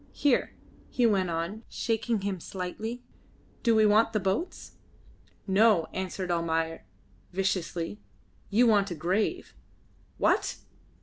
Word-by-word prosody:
Here," 285 -4 +1 0.3
he 245 - +1
went 195 -5 +2
on, 170 +6 -3
shaking 225 -1 -1
him 195 -2 -2
slightly, 215 +8 -5 0.6
"do 230 -2 +3
we 220 0 +5
want 215 +2 +4
the 215 - +2
boats?" 195 - -3 0.7
"No," 200 -3 +4
answered 185 -1 -3
Almayer, 165 - -1 0.5
viciously. 185 -1 -2 0.5
"You 230 +4 +4
want 205 -3 +4
a 175 - -4
grave." 190 - -1 0.6
"What? - - +1
195 Hz, 115 wpm, -28 LUFS, 180-225 Hz, 0.7 s, we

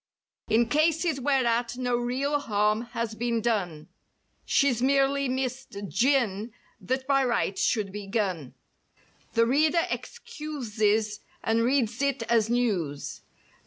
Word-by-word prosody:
In 225 +2 +3
cases 315 +2 +1
whereat 245 -3 +1
no 245 -1 0
real 260 +5 0
harm 210 -3 +1 0.2
has 230 -1 -1
been 235 +1 -1
done— 190 -9 -1 0.6
She's 255 -5 +2
merely 275 +1 +2
missed 260 -3 -3
"gin" 230 -3 +1 0.3
that 260 +1 -2
by 275 0 +3
right 235 -5 0
should 205 0 0
be 205 0 -7
"gun," 185 - -2 0.8
The 230 0 +4
reader 310 +7 +3
excuses 220 -8 -2 0.2
and 225 +1 +2
reads 240 -1 +1
it 275 -4 0
as 225 -1 +2
news. 195 -13 -1
240 Hz, 120 wpm, -27 LUFS, 215-270 Hz, 0.8 s, The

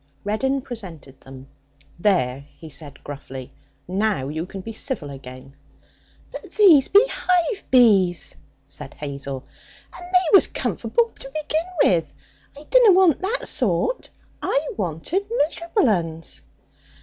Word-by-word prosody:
Reddin 265 +7 -1
presented 175 - -8
them. 135 0 -12 0.5
'There,' 140 -9 +1
he 160 - -11
said 140 -1 -5
gruffly; 135 -3 -9 0.3
'now 190 -7 -1
you 160 +4 -4
can 195 0 -8
be 225 +4 -8
civil 215 - -2
again.' 130 0 -11 0.8
'But - - -10
these 345 -10 +6
be 410 +4 +6
hive 365 +1 0
bees!' 200 -9 +4 0.3
said 140 0 -10
Hazel, 140 -2 -6 0.5
'and - - -11
they 365 0 +4
was 390 - +7
comforble 470 -1 -1
to 270 - -8
begin 310 +3 -2 0.2
with! 170 -3 +1 0.4
I 290 - -11
dunna 475 +2 +5
want 360 -5 +4
that 415 +7 -2
sort. - - 0 0.3
I 285 +2 0
wanted 205 - -3
miserable 340 - 0
uns!' 165 - -2
200 Hz, 125 wpm, -22 LUFS, -, 0.8 s, was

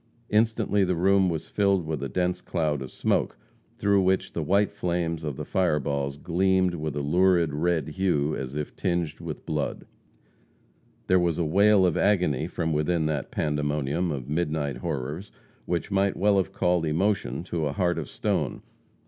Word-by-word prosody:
Instantly 110 -2 +2
the 90 -1 +1
room 95 +2 +3
was 80 -2 -3
filled 100 -5 +1
by 80 - -2
a 70 - -3
dense 90 +5 -1
cloud 75 -5 -1
of 65 - -6
smoke, - - 0 0.4
through 100 -1 +3
which 95 0 +1
the 85 - -2
white 100 +6 +2
flames 85 -2 -2
of 75 -3 -3
the - - -5
fireballs 70 -6 0
gleamed 95 +2 +1
with 75 -3 -4
a 75 - -2
lurid 85 0 +3
red 80 +2 0
hue 75 -4 0
as 65 +1 -5
if 75 -1 -4
tinged 85 -3 -1
with 85 -3 -7
blood. 75 -3 -3 1.2
There 95 0 +4
was 85 -2 +1
a 85 - 0
wail 100 +4 +4
of 90 - +1
agony 85 -8 +2
from 80 -3 -2
within 80 +2 +1
that 75 -3 -2
pandemonium 75 +2 -1
of 65 -4 -5
midnight 75 -3 -1
horrors 75 +9 -4 0.4
which 85 +3 -2
might 100 0 +1
well 100 0 +3
have 95 - 0
called 90 -1 +1
emotion 85 - 0
to 85 -4 -2
a - - -2
heart 85 -2 0
of 75 - -6
stone. - - -2
85 Hz, 170 wpm, -26 LUFS, 75-95 Hz, 1.2 s, There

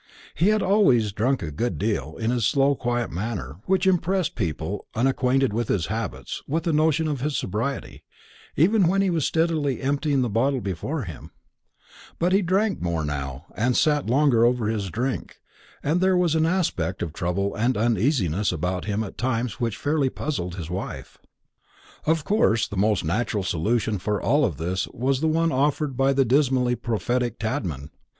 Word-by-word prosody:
He 170 - +2
had 215 0 +3
always 180 - +3
drunk 120 +5 0
a 75 - -4
good 120 +12 -2
deal, 80 -8 -2
in 110 +1 0
his 125 -2 0
slow 140 +5 +3
quiet 120 -2 -2
manner, 90 - -4
which 190 0 +2
impressed 185 -1 +1
people 85 -1 -3
unacquainted 130 0 +2
with 115 0 -1
his 90 -5 0
habits 95 - -4
with 160 +3 -1
a 165 - +1
notion 155 +1 +2
of 145 -4 -2
his 145 +1 -1
sobriety, 110 +9 -3 0.5
even 190 +4 +4
when 195 +3 +2
he 190 - +1
was 160 -4 0
steadily 160 -5 0
emptying 140 0 +1
the - - 0
bottle 130 +5 +1
before 115 - -3
him; 85 -7 -9 0.9
but 175 +2 +1
he 195 - +4
drank 195 +3 +1
more 85 -3 -1
now, 70 0 -4
and 120 +3 +1
sat 150 -4 +2
longer 130 -3 +4
over 120 -1 +2
his 105 -3 -2
drink, 125 +7 -3 0.5
and 160 +5 +1
there 185 -1 +3
was 175 -3 +2
an 160 0 +2
aspect 125 - -1
of 80 - -5
trouble 100 +3 -1
and 120 +3 0
uneasiness 110 - +1
about 90 +2 -2
him 105 +1 -1
at 100 - -9
times 120 -4 -1
which 115 -3 -1
fairly 145 -2 +1
puzzled 90 - -4
his 85 -4 -6
wife. 95 - -6 0.9
Of 160 -1 +2
course 115 - +2
the 105 - -7
most 100 -2 +1
natural 105 +4 -1
solution 105 +4 0
for 105 +2 -1
all 145 -3 +2
this 90 +4 -3
was 130 +2 -1
the 160 - +2
one 165 +1 +2
offered 140 +1 0
by 135 +2 +3
the 135 -1 +3
dismally 130 -1 +2
prophetic 120 +1 -1
Tadman. 95 - -3
120 Hz, 175 wpm, -24 LUFS, 100-150 Hz, 0.9 s, even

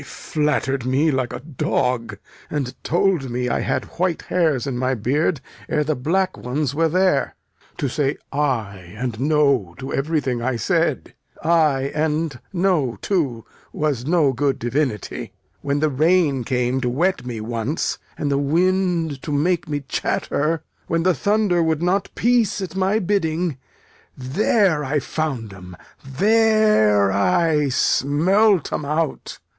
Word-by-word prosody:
They - - -11
flatter'd 145 -5 -1
me 135 +5 +2
like 130 -3 -1
a - - -6
dog, 125 -4 -1 0.3
and 135 -4 -3
told 175 -5 +1
me 125 +1 -2
I - - 0
had - - -1
white 180 -2 0
hairs 160 -8 +1
in 135 -3 -3
my 130 +1 0
beard 140 - 0 0.3
ere 150 - +1
the 155 +1 0
black 185 +8 0
ones 135 +2 -2
were 165 +2 +2
there. 185 -3 +1 0.4
To 140 - -1
say 140 +2 -1 0.2
'ay' 105 -10 -2
and 120 -2 -3
'no' 140 - +2
to 135 +1 -6
everything 135 -4 -1
I 125 +1 -1
said! 115 - 0 0.3
'Ay' 150 -5 +2
and 155 -3 -1
'no' 175 -9 +1
too 140 - -1 0.3
was 145 -4 -2
no 155 -5 +3
good 140 +2 0
divinity. 120 - -2 0.3
When 140 +1 -1
the 155 - +3
rain 150 -3 +2
came 125 +1 0
to 125 - 0
wet 175 +10 0
me 120 -3 -5
once, 115 +7 -2 0.2
and 145 - -1
the 140 - +2
wind 170 -1 +1
to 150 - -5
make 155 +3 0
me 145 -1 -2
chatter; 150 +3 -1 0.2
when 165 0 0
the 185 0 +3
thunder 200 - +1
would 160 0 0
not 190 +3 +1
peace 235 -4 +2
at 190 -1 -5
my 195 +2 +2
bidding; 175 - -1 0.6
there 160 - +1
I 145 +2 0
found 130 -8 -3
'em, 90 -2 -11 0.3
there 200 - +3
I 145 - +2
smelt 175 +10 +2
'em - - -2
out. 150 +1 -2
150 Hz, 145 wpm, -21 LUFS, 130-170 Hz, 0.6 s, no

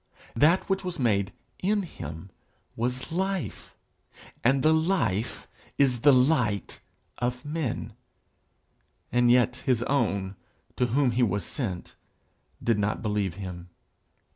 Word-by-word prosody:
That 160 +10 +4
which 195 0 0
was 180 -1 -4
made 100 -6 +1 0.3
in 205 +2 +1
him 80 - -8 0.4
was 125 +4 -2
life, 190 +1 -3 0.7
and 130 +2 +3
the 155 - +5
life 160 - 0 0.3
is 130 -4 +3
the 145 - +7
light 125 -6 +2 0.4
of 125 +3 -2
men; 150 -4 -3 1.2
and 120 0 +4
yet 125 0 +4
his 125 -3 0
own, 100 -8 0 0.4
to 125 - +2
whom 130 +2 +2
he 120 +2 0
was 100 -5 +1
sent, 95 -10 -4 0.7
did 115 -3 +2
not 105 +3 -1
believe 105 -5 -1
him. 90 -2 -7
125 Hz, 120 wpm, -27 LUFS, 105-145 Hz, 1.2 s, the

